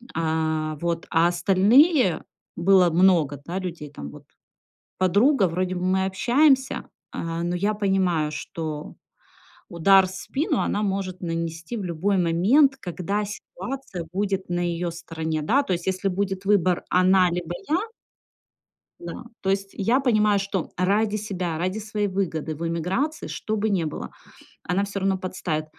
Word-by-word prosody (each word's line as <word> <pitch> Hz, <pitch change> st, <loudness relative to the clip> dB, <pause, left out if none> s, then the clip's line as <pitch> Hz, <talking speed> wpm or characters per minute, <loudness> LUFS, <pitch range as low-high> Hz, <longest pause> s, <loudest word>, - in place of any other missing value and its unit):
А. 160 Hz, -1 st, -1 dB
Вот. 170 Hz, 0 st, -2 dB
А 165 Hz, +1 st, +4 dB
остальные 195 Hz, -, +4 dB, 0.3 s
было 180 Hz, 0 st, +5 dB
много, 165 Hz, -5 st, +3 dB
да, 180 Hz, +3 st, -3 dB
людей, 170 Hz, -6 st, -6 dB
там, 70 Hz, 0 st, -8 dB
вот. -, -, -13 dB, 0.7 s
Подруга, 200 Hz, -, +3 dB
вроде 185 Hz, +2 st, -2 dB
бы 180 Hz, -, -3 dB
мы 190 Hz, +1 st, +2 dB
общаемся, 265 Hz, +7 st, +2 dB, 0.2 s
а, 165 Hz, 0 st, -4 dB
но 175 Hz, +1 st, -1 dB
я 200 Hz, +4 st, 0 dB
понимаю, 190 Hz, -7 st, +1 dB
что 155 Hz, -1 st, -6 dB, 0.7 s
удар 190 Hz, +3 st, +5 dB
в -, -, -9 dB
спину 275 Hz, -, -2 dB
она 205 Hz, -, 0 dB
может 190 Hz, -2 st, -2 dB
нанести 165 Hz, +4 st, -4 dB
в 205 Hz, -, -4 dB
любой 185 Hz, +4 st, 0 dB
момент, 200 Hz, -, +4 dB
когда 195 Hz, 0 st, -3 dB
ситуация 210 Hz, -2 st, -7 dB
будет 195 Hz, -1 st, -2 dB
на 175 Hz, -, -1 dB
её 175 Hz, 0 st, -1 dB
стороне, 160 Hz, -2 st, -4 dB
да. 255 Hz, -, +2 dB
То 190 Hz, -, -1 dB
есть 175 Hz, +1 st, -4 dB
если 190 Hz, +1 st, 0 dB
будет 195 Hz, 0 st, -2 dB
выбор 185 Hz, -3 st, +2 dB
она, 185 Hz, 0 st, +4 dB
либо 175 Hz, -1 st, -3 dB, 0.2 s
я. 315 Hz, -, +3 dB, 1.2 s
Да. 175 Hz, +8 st, -7 dB, 0.2 s
То 190 Hz, -, -1 dB
есть 195 Hz, 0 st, -1 dB
я 230 Hz, +7 st, +1 dB
понимаю, 215 Hz, -6 st, +3 dB
что 195 Hz, -3 st, -3 dB
ради 205 Hz, +4 st, +1 dB
себя, 185 Hz, -6 st, -3 dB
ради 185 Hz, +5 st, -2 dB
своей 210 Hz, -1 st, -2 dB
выгоды 165 Hz, -5 st, -2 dB
в 165 Hz, +3 st, -5 dB
эмиграции, 185 Hz, -, -2 dB
что 215 Hz, 0 st, -3 dB
бы 215 Hz, +1 st, 0 dB
не 185 Hz, -5 st, +1 dB
было, 150 Hz, -, -5 dB, 0.5 s
она 180 Hz, +3 st, 0 dB
всё 200 Hz, 0 st, -4 dB
равно 195 Hz, 0 st, +1 dB
подставит. 180 Hz, -4 st, -3 dB
185 Hz, 150 wpm, -24 LUFS, 170-205 Hz, 1.2 s, было